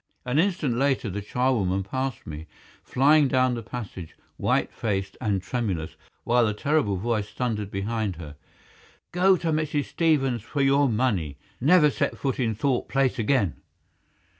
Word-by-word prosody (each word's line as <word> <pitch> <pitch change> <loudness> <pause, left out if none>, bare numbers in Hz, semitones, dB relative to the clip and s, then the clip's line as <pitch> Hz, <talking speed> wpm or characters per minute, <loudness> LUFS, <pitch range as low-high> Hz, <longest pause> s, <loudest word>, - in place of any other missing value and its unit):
An 125 +4 +1
instant 170 -8 +1
later 135 -5 +1
the 105 +3 -4
charwoman 100 -5 0
passed 130 +4 -4
me, 75 +1 -8 0.3
flying 145 +3 +4
down 130 -1 +2
the 120 - -3
passage, 100 -8 -8 0.2
white - - 0
faced 100 -3 -2
and 100 -4 0
tremulous, 95 -9 -3 0.3
while 120 +1 +3
the 105 - -2
terrible 140 -5 +1
voice 105 +1 -1
thundered 110 -5 -3
behind 105 0 -2
her. 75 -3 -9 0.8
"Go 185 +2 +4
to 165 -1 -1
Mrs. 150 -2 0
Stevens 135 -8 +1
for 140 +6 -2
your 140 0 +4
money! 105 - 0 0.2
Never 150 +2 +5
set - - -1
foot 135 -2 -2
in 115 -4 0
Thorpe 130 +3 -1
Place 135 -2 +1
again!" 110 - +1
120 Hz, 150 wpm, -25 LUFS, 100-140 Hz, 0.8 s, Never